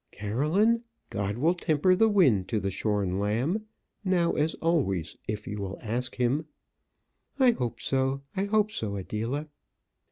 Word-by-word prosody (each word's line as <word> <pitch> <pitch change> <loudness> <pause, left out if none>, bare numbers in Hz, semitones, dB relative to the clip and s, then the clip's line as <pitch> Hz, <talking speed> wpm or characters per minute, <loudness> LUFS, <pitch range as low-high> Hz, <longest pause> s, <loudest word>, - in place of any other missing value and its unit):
"Caroline, 155 - +1 0.3
God 100 +1 -2
will 160 +7 +3
temper 175 0 +2
the 220 +4 +4
wind 135 - +4
to 110 -3 0
the 95 0 -2
shorn 100 -2 0
lamb, 130 - 0 0.4
now 180 -3 +2
as 155 +2 0
always 95 - 0
if 105 -1 -3
you 105 - -5
will 100 0 -4
ask 120 +3 -3
him." 130 +6 0 0.9
"I 260 -3 +6
hope 120 - -3
so; 135 +1 0
I 195 - 0
hope 210 0 +2
so, 105 - -3
Adela." 115 +10 -3
130 Hz, 150 wpm, -28 LUFS, -, 0.9 s, I